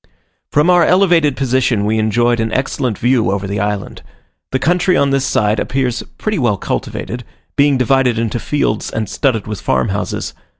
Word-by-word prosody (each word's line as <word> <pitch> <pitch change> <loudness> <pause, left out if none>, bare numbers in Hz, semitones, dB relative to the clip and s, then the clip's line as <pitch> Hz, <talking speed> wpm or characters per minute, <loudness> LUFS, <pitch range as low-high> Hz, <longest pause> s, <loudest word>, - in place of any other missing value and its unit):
From 150 +5 +3
our 175 -1 +5
elevated 170 -6 +3
position 130 -5 +1
we 110 +1 +1
enjoyed 120 +2 +1
an 110 0 -1
excellent 130 -4 -1
view 120 -1 +2
over 100 0 -1
the 100 +1 -3
island. 105 0 -3 0.5
The 130 - +1
country 180 +6 +2
on 140 -1 +2
this 135 -1 +1
side 105 -5 +1
appears 125 -3 -1 0.2
pretty 215 -4 -2
well 120 -6 +1
cultivated, 120 +5 -4 0.3
being 140 -1 +3
divided 130 -1 +2
into 115 +1 -1
fields 140 -7 -1
and 110 -2 -3
studded 115 -1 0
with 105 -2 -6
farm 65 -1 0
houses. - - -3
125 Hz, 170 wpm, -16 LUFS, 110-140 Hz, 0.5 s, our